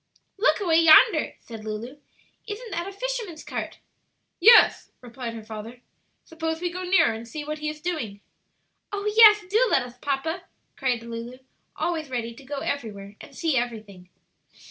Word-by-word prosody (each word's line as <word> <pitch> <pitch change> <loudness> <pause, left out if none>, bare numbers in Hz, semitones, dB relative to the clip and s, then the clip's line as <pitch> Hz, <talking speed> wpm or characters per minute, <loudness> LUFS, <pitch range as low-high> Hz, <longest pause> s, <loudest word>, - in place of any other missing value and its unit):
"Look 480 - +3
away 335 -5 +3
yonder," 325 +2 +6
said 225 -2 -10
Lulu; 220 +6 -6 0.5
"isn't 440 +2 -7
that 340 +1 -3
a - - -6
fisherman's 430 -6 -5
cart?" - - -5 0.6
"Yes," 455 +6 +6
replied 240 -1 -7
her 225 - -8
father. 220 +3 -9 0.4
"Suppose 320 0 -4
we 350 0 -2
go 365 +1 -6
nearer 360 -8 +3
and 225 +1 -8
see 295 +6 -6
what 305 +1 -5
he 305 0 -2
is 305 0 -8
doing." 280 - -4 0.7
"Oh, 405 0 -4
yes; 425 -3 +8
do 445 +6 +3
let 270 - +3
us, 245 0 -12
papa!" 285 +6 -3 0.3
cried 250 -4 -1
Lulu, 235 +2 -7 0.4
always 320 -4 -2
ready 235 -2 -4
to 250 - -15
go 275 +1 -5
everywhere 205 -7 -5
and 285 - -13
see 320 -1 0
everything. 215 -7 -4
290 Hz, 165 wpm, -25 LUFS, 235-350 Hz, 0.7 s, yes